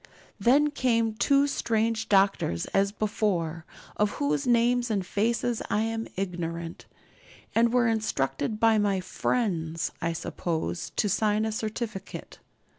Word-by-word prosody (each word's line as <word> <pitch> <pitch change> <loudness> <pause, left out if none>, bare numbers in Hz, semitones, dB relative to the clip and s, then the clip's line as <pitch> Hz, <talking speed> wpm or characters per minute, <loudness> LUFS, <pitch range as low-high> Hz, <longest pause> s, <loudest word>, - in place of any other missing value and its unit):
Then 280 +8 +4
came 230 -5 +1
two 275 +5 +3
strange 225 -4 0
doctors 195 - +2
as 195 0 +3
before, 185 -6 -1 0.3
of 210 -1 +1
whose 145 0 -1
names 240 0 +3
and 200 -4 -1
faces 230 +4 0
I 210 - +1
am 225 0 -2
ignorant, 170 -3 -4 0.7
and 230 0 +3
were 245 -1 +3
instructed 215 -4 -1
by 225 -1 +4
my 200 -2 +1
'friends,' 170 -5 -1
I 165 -1 0
suppose, 165 +1 -3
to 210 - +1
sign 210 +2 +1
a 220 - -1
certificate. 215 -2 -5
215 Hz, 125 wpm, -27 LUFS, 180-230 Hz, 0.7 s, Then